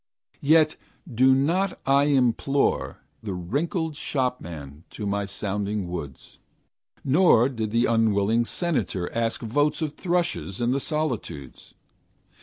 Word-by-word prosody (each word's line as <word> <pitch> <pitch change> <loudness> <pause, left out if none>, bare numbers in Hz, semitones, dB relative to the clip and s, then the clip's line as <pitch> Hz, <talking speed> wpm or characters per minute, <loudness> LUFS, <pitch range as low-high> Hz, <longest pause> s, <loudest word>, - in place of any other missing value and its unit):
Yet 155 +1 +4 0.4
do 130 +3 +5
not 175 +8 0
I 140 +1 +4
implore 135 0 +1 0.2
The 100 -4 -4
wrinkled 155 - -2
shopman 85 - -4
to 105 - -7
my 100 0 -1
sounding 100 0 -3
woods, 80 -6 -8 0.6
Nor 135 -5 +5
bid 115 -5 -3
the 115 +3 +2
unwilling 115 0 +2
senator 135 - -2
Ask 115 +1 -1
votes 145 +7 +1
of 155 -3 -2
thrushes 170 - -2
in 120 0 +1
the 135 - +1
solitudes. 130 - -4
120 Hz, 115 wpm, -25 LUFS, 100-145 Hz, 0.6 s, do